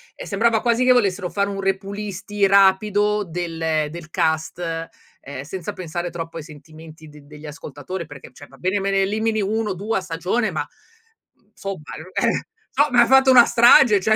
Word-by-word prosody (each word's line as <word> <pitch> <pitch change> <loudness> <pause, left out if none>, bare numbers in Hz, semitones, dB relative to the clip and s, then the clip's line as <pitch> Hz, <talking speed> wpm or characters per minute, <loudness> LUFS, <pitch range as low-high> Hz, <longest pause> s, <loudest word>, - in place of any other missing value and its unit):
ehm, - - -9
sembrava 220 +2 +1
quasi 240 0 +1
che 255 - +4
volessero 200 -6 +1
fare 200 +1 -1
un 195 -1 -4
repulisti 200 +1 -2
rapido 205 +2 +3
del 165 -3 -2
del 170 -1 -10
cast, 160 0 -1
ehm, 165 -5 -7
senza 170 +4 -6
pensare 175 0 -5
troppo 165 -1 -7
ai 160 - -6
sentimenti 155 +1 -14
d 150 0 -14
degli 150 +2 -14
ascoltatori, 150 +3 -7
perché 145 -3 -12
cioè 145 +3 -14
va - - -18
bene 185 +3 -1
me 195 0 -2
ne 195 0 +2
elimini 220 +2 -1
1 215 +2 -1
o - - -4
2 210 +4 -2
a - - -2
stagione 185 +6 -2
ma, - - -4 0.7
mhmm, - - -37
insomma 195 -4 -6 0.3
eh - - 0 0.3
somma 265 -3 +3
hai 235 - +4
fatto 265 0 +5
una 245 -2 +8
strage 235 -2 +6
cioè 215 +3 +2
190 Hz, 180 wpm, -21 LUFS, 165-210 Hz, 0.7 s, una